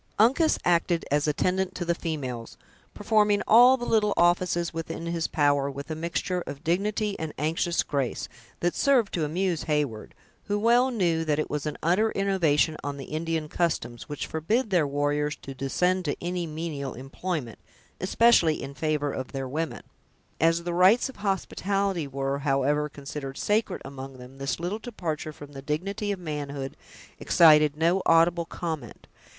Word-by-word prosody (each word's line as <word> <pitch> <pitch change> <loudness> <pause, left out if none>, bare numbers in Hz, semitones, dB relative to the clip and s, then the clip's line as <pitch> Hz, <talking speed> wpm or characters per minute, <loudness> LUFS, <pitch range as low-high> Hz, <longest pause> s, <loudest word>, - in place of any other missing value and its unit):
Uncas 270 +9 +4
acted 170 -1 +2
as 145 +1 +2
attendant 185 +5 0
to 175 - -3
the 170 - +2
females, 135 -9 -5 0.4
performing 210 -1 +2
all 245 +4 +7
the 240 - -5
little 210 -3 +2
offices 175 0 +2
within 165 0 -5
his 170 -1 -1
power, 145 -2 +2
with 140 +3 -7
a - - -2
mixture 170 +3 -2
of 140 +2 -7
dignity 205 +4 0
and 160 -1 -5
anxious 165 +3 0
grace, 140 -4 -2 0.3
that 175 0 +1
served 255 -7 +2
to 165 - 0
amuse 170 +2 -1
Heyward, 145 -8 -2 0.3
who 205 0 0
well 240 +4 +4
knew 175 -9 +1
that 150 -2 +1
it 155 - -2
was 150 0 -2
an 150 - -4
utter 185 +7 +3
innovation 165 -6 +2
on 140 0 -4
the 135 - -7
Indian 160 0 -2
customs, 150 -8 -2
which 145 - -4
forbid 210 +9 -1
their 170 -6 +3
warriors 145 +1 0
to 135 - -9
descend 180 +8 0
to 145 - -1
any 175 0 -3
menial 150 -4 -5
employment, 135 - -5 0.4
especially 185 -5 +4
in 140 - -6
favor 150 -1 -1
of 130 -1 -6
their 135 -1 -3
women. 155 +4 -3 0.6
As 165 +1 +3
the 175 0 -3
rights 190 +9 +5
of 265 - -11
hospitality 195 -3 -1
were, 135 0 -2
however, 145 +1 +1
considered 140 -1 -7
sacred 210 -2 0
among 135 -1 -8
them, 125 +2 -13
this 135 +3 -2
little 180 +6 -3
departure 165 -10 -4
from 145 -1 -12
the 135 -1 -8
dignity 190 +8 -2
of 200 - -2
manhood 145 -5 -5 0.4
excited 150 -3 +5
no 170 +4 +2
audible 170 +1 +4
comment. 160 -9 -6
165 Hz, 165 wpm, -26 LUFS, 145-185 Hz, 0.6 s, all